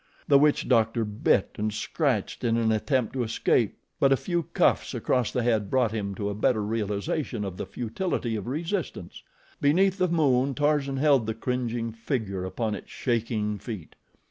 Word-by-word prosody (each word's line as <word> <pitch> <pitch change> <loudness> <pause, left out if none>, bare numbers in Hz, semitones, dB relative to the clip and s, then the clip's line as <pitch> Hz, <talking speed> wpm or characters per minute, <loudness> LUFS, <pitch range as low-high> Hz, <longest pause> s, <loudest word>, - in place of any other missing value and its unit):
The 140 -1 +6
witch 150 0 +3
doctor 115 -2 +2
bit 105 -1 +1
and 105 +1 0
scratched 125 - -1
in 115 -1 +2
an 115 -1 +2
attempt 125 +2 0
to 130 - -1
escape; 115 -1 +1 0.2
but 135 - +4
a 135 - +5
few 175 +3 -1
cuffs - - +2
across 125 -3 +1
the 125 - -1
head 110 -4 +1
brought 125 -4 +2
him 100 -3 -3
to 100 +1 -3
a 100 - -1
better 105 +1 +1
realization 105 - -2
of 95 -2 -5
the - - -5
futility 120 - -2
of 105 -1 -5
resistance. 160 - -4 0.4
Beneath 185 +7 +3
the 185 - +3
moon 140 -5 +2
Tarzan 145 -1 +1
held 135 -5 +3
the 110 - -2
cringing 120 -1 -2
figure 110 -5 -3
upon 110 +3 -2
its 100 - -7
shaking 110 -4 -1
feet. 105 -5 -7
115 Hz, 170 wpm, -27 LUFS, 105-140 Hz, 0.4 s, The